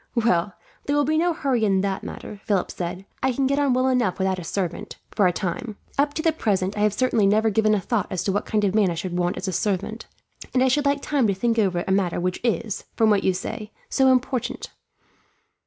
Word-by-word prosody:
"Well, 205 -5 +2 0.3
there 285 - 0
will 290 -1 +3
be 310 +2 +2
no 350 +1 +2
hurry 270 -8 0
in 195 -3 +3
that 195 -1 -2
matter," 205 -2 -8
Philip 200 -4 0
said. 180 +2 -5 0.2
"I 265 - +2
can 270 +2 0
get 275 +2 +1
on 285 -2 +2
well 255 +1 +2
enough 245 -8 +1
without 190 -1 0
a - - -6
servant, 175 0 -4
for 200 - +3
a - - +3
time. 205 +4 -4 0.2
Up 290 +1 +1
to 315 - -2
the 325 - +4
present, 200 -9 -1
I - - -4
have 210 -1 +3
certainly 230 -4 +2
never 215 +2 +3
given 215 +1 +3
a - - +1
thought 220 +3 -1
as 185 -1 -2
to 195 - 0
what 205 - -2
kind 210 -1 +1
of 195 -2 +2
man 210 -3 +3
I 170 - -2
should 175 +1 -4
want 175 0 0
as 185 - -4
a 190 - -2
servant; 205 +4 -2 0.5
and 255 - +4
I 260 - +4
should 290 +3 +1
like 280 0 +1
time 275 -6 +1
to 200 - +1
think 230 +3 +1
over 180 -4 +1
a - - 0
matter 190 -3 +1
which 180 +1 -1
is, 230 -3 -1
from 220 -1 +4
what 200 -2 +2
you 190 - +2
say, 210 +3 -5 0.2
so 265 - +3
important." 255 -1 -1
210 Hz, 245 wpm, -24 LUFS, 190-255 Hz, 0.5 s, the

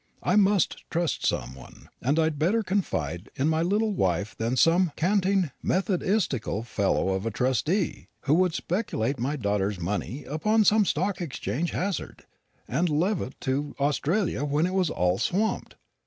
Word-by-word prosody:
I 180 - +2
must 200 -3 +3
trust 170 -2 -1
some - - -1
one, 65 -1 -14
and 140 +6 +1
I'd 160 -2 +1
better 205 +9 +2
confide 90 - -2
in 135 - +1
my 160 0 +2
little 210 +5 +1
wife 95 - 0
than 115 +2 -1
in - - -1
some 165 +5 +4
canting 190 -2 +1
methodistical 185 - 0
fellow 100 -4 0
of 95 +3 -1
a - - +1
trustee, 130 - 0
who 145 - +1
would 180 0 +3
speculate 140 - -1
my 135 +5 -1
daughter's 100 -5 -1
money 105 - -3
upon 215 +10 +1
some 210 0 +5
Stock 185 +3 -1
Exchange 155 - -2
hazard, 190 -4 -3 0.4
and 165 +8 0
levant 165 - -1
to 140 +3 -2
Australia 150 +4 0
when 145 +3 +1
it 185 - -2
was 185 -4 +2
all 90 +1 +1
swamped. 210 +5 -1
155 Hz, 155 wpm, -26 LUFS, 120-185 Hz, 0.4 s, some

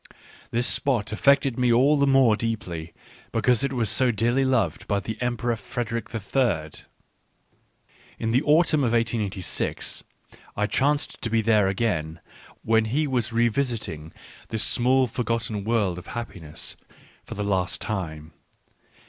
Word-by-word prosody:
This 120 +1 +1
spot 120 -7 +1
affected 135 +2 +3
me 125 -1 +3
all 135 +6 +5
the 140 -1 +2
more 135 -5 +5
deeply 95 -8 -4 0.4
because 125 -2 +2
it 140 - 0
was 120 -4 0
so 130 +5 +3
dearly 120 +4 +1
loved 115 -11 0
by 100 -1 +1
the 110 +3 -5
Emperor 120 -1 -1
Frederick 115 +1 -4
III. 105 - -1 1.5
In 110 - -2
the 125 +3 +3
autumn 155 -1 +3
of 120 -2 +1
1886 110 -6 -2 0.5
I 105 - +2
chanced 145 +6 0
to 115 - -2
be 115 0 +1
there 105 -3 +3
again 85 -6 -1 0.4
when 110 0 +3
he 140 +8 0
was 125 -4 -1
revisiting 115 - -1 0.4
this 110 -1 +1
small 130 +2 +3
for 125 +1 -4
gotten 115 -3 -2
world 105 -5 0
of 90 - -14
happiness 90 -10 -7 0.5
for - - -8
the 105 - -3
last 95 -2 0
time. 80 -6 -5
115 Hz, 140 wpm, -25 LUFS, 100-125 Hz, 1.5 s, all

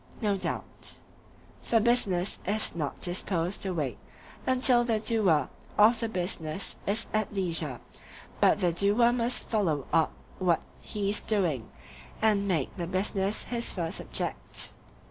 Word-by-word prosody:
No 205 -3 +1
doubt. 190 - -2 0.6
For 230 - +2
business 210 -5 +1
is 210 +3 +1
not 150 -4 -4
disposed 175 0 -1
to 195 - +1
wait 145 - -3 0.5
until 255 -1 +5
the 230 -2 +1
doer 195 - +2 0.3
of 220 +3 +6
the 230 - -2
business 175 -3 -3
is 210 +3 +1
at 215 -2 0
leisure; 165 -9 +1 0.6
but 210 - +4
the 175 -2 +2
doer 205 +7 +4
must 245 0 -1
follow 165 - 0
up 165 -1 +3 0.3
what 175 -3 +2 0.2
he 200 -1 -2
is 210 - -1
doing, 170 - 0 0.5
and 210 -2 +2
make 165 -8 -1
the 170 -2 -3
business 195 +2 0
his 235 -1 -2
first 170 -1 -3
object. - - -2
195 Hz, 140 wpm, -28 LUFS, 170-220 Hz, 0.6 s, of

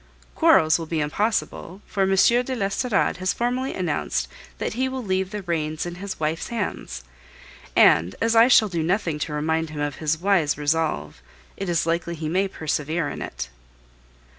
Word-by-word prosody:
Quarrels 160 - +4
will 165 - -5
be 160 0 -1
impossible, 190 +3 -2
for 200 - -3
M. 195 0 +3
de 245 +6 +3
l'Estorade 200 0 0
has 185 +1 0
formally 250 +2 -1
announced 150 - -1 0.3
that - - -3
he 260 +3 0
will 260 -1 -4
leave 190 -2 -1
the 210 -1 -5
reins 155 -3 -2
in 175 - -5
his 200 -1 -5
wife's 155 +1 -1
hands; 205 - -4 0.7
and 85 +4 +5
as 225 0 +1
I 225 +1 +7
shall 225 -4 +6
do 170 -4 -2
nothing 165 -2 0
to 150 0 -3
remind 160 +2 -1
him 150 -1 -7
of 145 -1 -3
this 155 0 0
wise 175 -6 +2
resolve, 145 - -1 0.3
it 195 -2 -4
is 170 -2 +1
likely 170 +1 -1
he 155 -1 -4
may 190 +4 +1
persevere 155 -2 -2
in - - -6
it. 65 - -5
170 Hz, 175 wpm, -24 LUFS, 155-200 Hz, 0.7 s, I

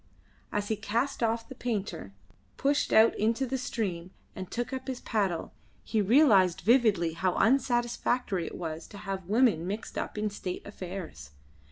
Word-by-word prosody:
As 205 0 -2
he 220 - +1
cast 230 +7 -2
off 230 0 0
the - - -8
painter, 200 - -4 0.5
pushed 285 +1 +1
out 220 +1 +6
into 230 +5 +1
the 265 +1 -2
stream, 190 -9 -3 0.3
and 185 -1 -6
took 240 +3 -3
up 260 0 -5
his 260 -2 -3
paddle, 195 -7 -1 0.3
he 220 - 0
realised 200 - +5
vividly 205 -6 +3
how 180 +2 0
unsatisfactory 240 -5 +1
it - - -7
was 160 -1 -5
to 200 - -11
have 195 -2 -5
women 215 -7 +3
mixed 210 +3 -4
up - - -5
in 210 0 -1
state 185 -3 -5
affairs. 180 - -8
210 Hz, 160 wpm, -29 LUFS, 185-240 Hz, 0.5 s, out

